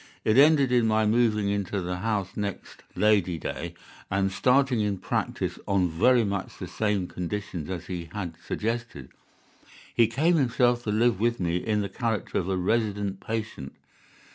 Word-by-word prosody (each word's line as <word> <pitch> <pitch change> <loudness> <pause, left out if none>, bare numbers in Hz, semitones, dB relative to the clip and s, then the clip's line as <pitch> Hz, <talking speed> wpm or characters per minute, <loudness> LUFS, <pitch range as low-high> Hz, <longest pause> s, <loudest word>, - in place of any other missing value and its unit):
It 110 - +3
ended 140 -1 +6
in 120 -2 +3
my 110 0 +2
moving 105 -2 +2
into 100 -1 -1
the 90 0 -3
house 100 -1 -2
next 100 -2 -5
Lady 100 -5 +2
Day, 85 +2 -5 0.3
and 95 0 +1
starting 130 +3 +3
in 105 -2 0
practice - - -2
on 95 -3 +2
very 120 +9 +4
much 100 -2 -3
the 95 - -6
same 105 +1 -1
conditions 90 -2 -5
as 90 -2 -4
he 85 -2 -6
had 90 -5 -4
suggested. 115 - -4 0.8
He 115 - +4
came 155 +9 +2
himself 125 -3 +2
to 105 - 0
live 110 -1 +2
with 120 +2 +1
me 85 -1 0
in 105 +3 0
the 100 - -2
character 110 +1 -2
of 95 - -3
a 95 - 0
resident 100 0 0
patient. 110 -11 -5
105 Hz, 165 wpm, -26 LUFS, 95-115 Hz, 0.8 s, ended